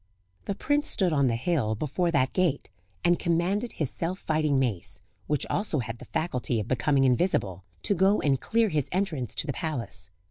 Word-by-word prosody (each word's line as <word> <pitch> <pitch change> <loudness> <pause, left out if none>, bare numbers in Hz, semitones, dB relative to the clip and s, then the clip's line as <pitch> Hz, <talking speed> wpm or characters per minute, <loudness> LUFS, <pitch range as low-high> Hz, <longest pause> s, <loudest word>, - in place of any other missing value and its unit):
The 200 - -2
prince 290 +6 0
stood 180 -4 +2
on 140 -3 +3
the 115 - +1
hill 120 -4 0
before 155 - -1
that 130 -5 +1
gate, 180 -7 0 0.3
and 175 -1 +4
commanded 180 +7 0
his 150 -6 -1
self 175 +3 -2
fighting 155 -5 +1
mace, 100 -6 0 0.2
which 150 -2 0
also 205 -5 0
had 115 -2 -4
the - - -10
faculty 125 -7 -1
of 105 - -4
becoming 135 +2 +2
invisible, 125 - +1 0.2
to - - +2
go 195 +3 +3
and 135 -3 +1
clear 230 -1 +2
his 150 -6 -1
entrance 170 - -1
to - - 0
the 140 - -2
palace. 120 - -2
150 Hz, 185 wpm, -27 LUFS, 125-180 Hz, 0.3 s, and